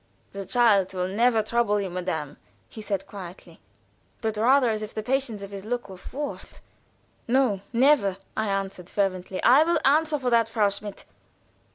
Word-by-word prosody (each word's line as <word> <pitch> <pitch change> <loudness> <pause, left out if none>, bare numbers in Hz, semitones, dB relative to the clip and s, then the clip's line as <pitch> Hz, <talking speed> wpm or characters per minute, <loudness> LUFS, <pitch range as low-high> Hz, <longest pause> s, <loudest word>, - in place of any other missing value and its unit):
"The 195 -1 -7
child 205 -5 +3
will 180 0 -1
never 225 +3 +2
trouble 215 -2 +1
you, 195 -3 -3
madame," 175 -5 -4 0.3
said 210 -3 -3
he, - - -29
quietly, 185 -3 -10 0.6
but 220 -1 -2
rather 245 +3 +4
as 215 -1 -2
if 215 0 -7
the 215 - -3
patience 250 -4 -1
of 200 - -8
his 195 -1 -7
look 240 0 -4
were 190 - -8
forced. 285 +10 -7 0.7
"No, 240 -6 +2
never!" 235 -6 +3 0.2
I 220 - -1
added, 195 -2 -3
fervently. 190 -2 -2
"I 265 +6 +7
will 340 +1 +2
answer 305 +2 +3
for 255 -3 -2
that, 230 -1 +3
Frau 215 -3 +2
Schmidt." 200 0 -8
215 Hz, 170 wpm, -25 LUFS, 195-245 Hz, 0.7 s, I